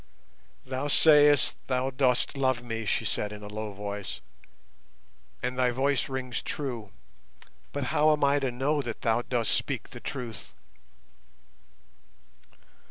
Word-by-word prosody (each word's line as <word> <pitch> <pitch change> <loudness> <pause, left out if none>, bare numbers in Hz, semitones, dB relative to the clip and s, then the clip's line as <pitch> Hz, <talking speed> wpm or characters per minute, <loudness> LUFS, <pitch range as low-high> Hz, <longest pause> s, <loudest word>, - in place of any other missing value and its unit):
"Thou 130 +2 -3
sayest 145 -4 +6
thou 130 0 0
dost 130 0 +1
love 130 -3 +1
me," 115 -2 -4
she - - 0
said 105 - -1
in 105 0 -9
a - - -7
low 105 0 -5
voice, 100 -1 -5 1.2
"and 125 +1 -2
thy 125 -1 +4
voice 135 +2 0
rings 130 -2 -3
true, 120 -8 -4 0.8
but - - -3
how 155 +1 +5
am 150 -1 +1
I 140 +1 +4
to 135 -2 -1
know 140 +4 0
that 120 -4 -6
thou 115 +1 +2
dost 120 -2 0
speak - - -1
the - - -8
truth?" 120 -4 -6
125 Hz, 135 wpm, -28 LUFS, 115-140 Hz, 1.2 s, sayest